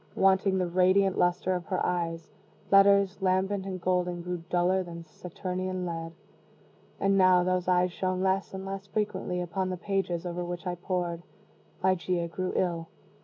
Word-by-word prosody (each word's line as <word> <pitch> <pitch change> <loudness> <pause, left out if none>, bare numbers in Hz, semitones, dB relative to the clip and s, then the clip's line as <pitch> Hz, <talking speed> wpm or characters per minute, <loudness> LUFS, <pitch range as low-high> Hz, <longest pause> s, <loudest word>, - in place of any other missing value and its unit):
Wanting 190 0 +3
the 185 - +1
radiant 185 +2 +3
luster 180 +1 +1
of 180 -2 -4
her 185 - -1
eyes, 165 -2 -2 0.4
letters, 200 0 +5
lambent 190 +1 +1
and 185 -1 -4
golden, 180 -1 0
grew 180 -1 -4
duller 180 +2 +2
than 170 -2 -8
Saturnian 185 +2 -5
lead. 165 -1 -5 0.9
And 195 0 +3
now 185 -1 +6
those 185 0 0
eyes 180 0 +3
shone 185 +1 -2
less 190 +1 +1
and 190 0 -6
less 195 0 -6
frequently 190 -3 -2
upon 185 +2 -2
the 185 - -3
pages 185 -2 -2
over 175 0 -3
which 175 +1 -5
I 180 - -1
pored. 175 -1 -3 0.6
Ligeia 180 -2 +1
grew 185 +2 -3
ill. 170 -3 0
185 Hz, 160 wpm, -28 LUFS, 175-190 Hz, 0.9 s, now